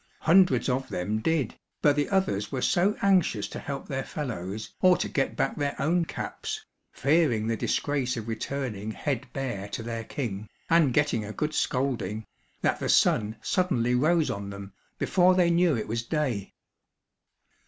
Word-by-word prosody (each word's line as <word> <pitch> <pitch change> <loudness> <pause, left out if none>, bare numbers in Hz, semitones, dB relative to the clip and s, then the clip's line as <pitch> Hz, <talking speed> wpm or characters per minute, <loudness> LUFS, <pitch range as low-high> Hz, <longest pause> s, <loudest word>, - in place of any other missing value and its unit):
Hundreds 180 +3 +4
of 130 0 -1
them 105 +5 -2
did, 145 0 0 0.3
but 145 -1 +4
the 145 0 0
others 185 - 0
were 135 - -2
so 190 +4 +2
anxious 185 - +3
to - - -7
help 140 -1 -5
their 135 -1 -2
fellows, 110 - -5
or 185 -1 +6
to - - -1
get 135 - -1
back 135 - 0
their 145 -1 -2
own 170 +3 +2
caps, - - -5 0.3
fearing 140 -7 +2
the 115 0 0
disgrace 130 +2 -1
of 110 -1 -5
returning 110 -2 -3
head 130 +2 -3
bare 125 -8 -4
to 115 - -5
their 115 0 -4
king, 110 -5 -5 0.2
and 165 -5 +5
getting 145 -7 +2
a 105 - -6
good 150 +7 -2
scolding, 120 -7 -1 0.4
that - - +1
the - - -2
sun 110 +1 +3
suddenly 150 - +1
rose 155 +5 +3
on 100 0 -5
them, 100 -1 -8 0.2
before 185 0 +4
they 175 -2 +4
knew 170 -5 +3
it 110 - -4
was 115 +1 -1
day. 120 - -2
135 Hz, 165 wpm, -27 LUFS, 110-155 Hz, 0.4 s, or